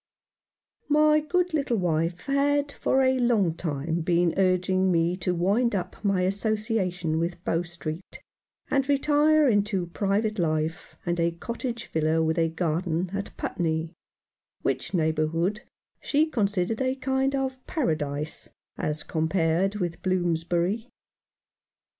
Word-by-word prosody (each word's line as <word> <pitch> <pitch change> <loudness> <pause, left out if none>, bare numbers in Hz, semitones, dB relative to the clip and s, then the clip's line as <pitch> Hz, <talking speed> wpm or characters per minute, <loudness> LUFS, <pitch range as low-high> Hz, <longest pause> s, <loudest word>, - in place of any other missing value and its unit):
My 305 +1 +5
good 355 +3 0
little 280 -6 +1
wife 170 -1 0
had 285 +1 +1
for 265 -1 +1
a 260 0 +3
long 225 -9 +2
time 160 0 -2
been 170 0 +2
urging 185 0 +2
me 170 +1 +2
to 180 -1 -1
wind 205 +7 +2
up 185 - -4
my 195 -3 +2
association 195 -4 0
with 170 +1 -3
Bow 165 - +1
Street, 175 0 -7 0.5
and 275 0 +1
retire 295 +2 +4
into 205 -5 +1
private 200 +4 -1
life, 160 +2 -1
and 175 -1 -1
a 170 0 +3
cottage 235 +7 -5
villa 160 +1 +1
with 160 +1 +1
a 165 0 +2
garden, 170 +1 -1
at 200 0 -5
Putney, 160 -1 -2 0.7
which - - -1
neighbour 155 -2 +1
hood 175 +7 -1 0.4
she 300 +2 +2
considered 210 - -1
a 260 0 +1
kind 265 +1 0
of 265 -1 -3
Paradise 155 - -2 0.3
as 150 0 -2
com 160 -1 -1
pared 180 +3 +1
with 175 -4 -3
Bloomsbury. 175 +4 0
185 Hz, 130 wpm, -26 LUFS, 165-240 Hz, 0.7 s, My